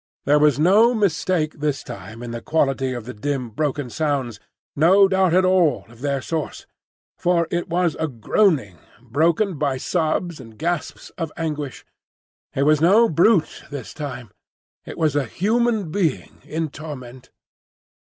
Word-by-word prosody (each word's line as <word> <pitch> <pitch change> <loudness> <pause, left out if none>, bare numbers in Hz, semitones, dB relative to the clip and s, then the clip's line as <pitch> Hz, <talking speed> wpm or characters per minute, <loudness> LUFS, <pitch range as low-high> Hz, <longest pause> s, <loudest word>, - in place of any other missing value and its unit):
There 145 +2 +4
was 150 -2 +4
no 210 +10 +5
mistake 180 -6 0
this 145 -2 -1
time 110 +5 -9
in 120 - -6
the 120 0 -5
quality 135 -3 0
of 120 -3 -5
the 125 - -7
dim, 125 +1 -3
broken 145 0 -2
sounds; 140 -8 -2 0.4
no 190 +6 +6
doubt 190 -2 +2
at 185 +2 +4
all 180 -7 +2
of 115 +1 -17
their 140 -2 -1
source. 160 -3 -4 0.5
For 175 -2 +2
it 175 0 -2
was 175 -1 +1 0.2
groaning, 125 - +1 0.2
broken 160 - +1
by 140 -3 0
sobs 165 +2 -1
and 115 -4 -13
gasps 170 0 -3
of 165 -2 -3
anguish. 150 -5 -4 0.7
It 135 - +2
was 150 +1 +3
no 210 +8 +5
brute 170 +2 +2
this 140 -5 -7
time; 125 -8 -7 0.5
it - - -8
was 155 -3 +1
a 145 -2 +1
human 215 - 0
being 165 -7 -2
in 160 0 -3
torment! 130 -5 -9
155 Hz, 150 wpm, -22 LUFS, 135-175 Hz, 0.7 s, no